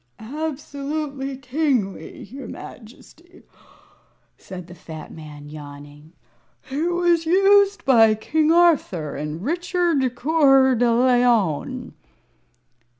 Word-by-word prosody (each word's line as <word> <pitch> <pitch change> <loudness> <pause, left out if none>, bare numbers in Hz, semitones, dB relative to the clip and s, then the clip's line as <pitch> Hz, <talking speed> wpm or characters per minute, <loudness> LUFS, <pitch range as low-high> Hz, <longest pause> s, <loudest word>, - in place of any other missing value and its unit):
"Absolutely 280 +1 -5
kingly, 255 -6 -2
your 265 +7 -10
Majesty," 300 +9 -13 0.9
said 185 -2 -10
the 175 - -13
fat 160 -3 -10
man, 150 -2 -11
yawning. 145 +1 -12 0.6
"It 315 +6 -1
was 345 -2 +1
used 395 +3 +4
by 225 -5 +5
King 310 +8 0
Arthur 310 - +2
and 150 +4 -5
Richard 340 -5 0
Coeur 270 -2 +4
de 240 0 +2
Leon." 240 - +1
265 Hz, 90 wpm, -22 LUFS, 195-320 Hz, 0.9 s, by